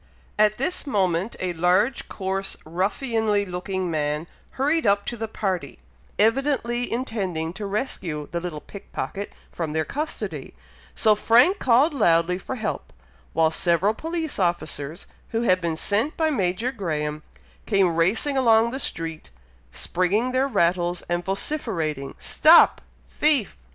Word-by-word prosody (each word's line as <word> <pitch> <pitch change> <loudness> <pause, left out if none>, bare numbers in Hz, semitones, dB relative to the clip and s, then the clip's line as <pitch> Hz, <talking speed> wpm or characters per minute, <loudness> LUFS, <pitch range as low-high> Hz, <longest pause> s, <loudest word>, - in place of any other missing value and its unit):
At 215 0 +4
this 295 +4 -2
moment, 190 -3 0
a 180 -1 -2
large 180 +9 +1
coarse 195 0 -2
ruffianly 205 - 0
looking 185 0 -3
man 150 0 -1 0.3
hurried 290 +1 +1
up 200 0 +3
to 240 - -3
the 225 -1 -4
party, 195 -5 -3 0.4
evidently 240 +1 +1
intending 190 -10 -2
to 200 +2 -5
rescue 185 - -3
the 170 - -1
little 170 -4 -5
pick 200 - -12
pocket 200 +1 -4 0.2
from 160 -3 -4
their 160 0 0
custody; 300 +2 -5 0.4
so 215 -2 +4
Frank 240 - +4
called 265 +6 +4
loudly 180 -7 +2
for 260 - -5
help, 220 -4 -4 0.4
while 160 0 +3
several 175 +5 +2
police 325 +1 -4
officers 160 -4 -2 0.2
who 225 +1 -1
had 185 -5 +3
been 165 -2 -1
sent 215 - 0
by 315 -1 +2
Major 210 0 0
Graham, 155 - -3 0.5
came 195 -5 +3
racing 205 - +1
along 230 -3 +4
the 265 - -4
street, 165 - -4 0.4
springing 200 +8 0
their 260 +2 +2
rattles, 175 -5 +1
and 175 0 0
vociferating, 185 - -3
"Stop 325 +2 +5 0.3
thief!" 290 -9 +2
200 Hz, 135 wpm, -24 LUFS, 170-240 Hz, 0.5 s, Stop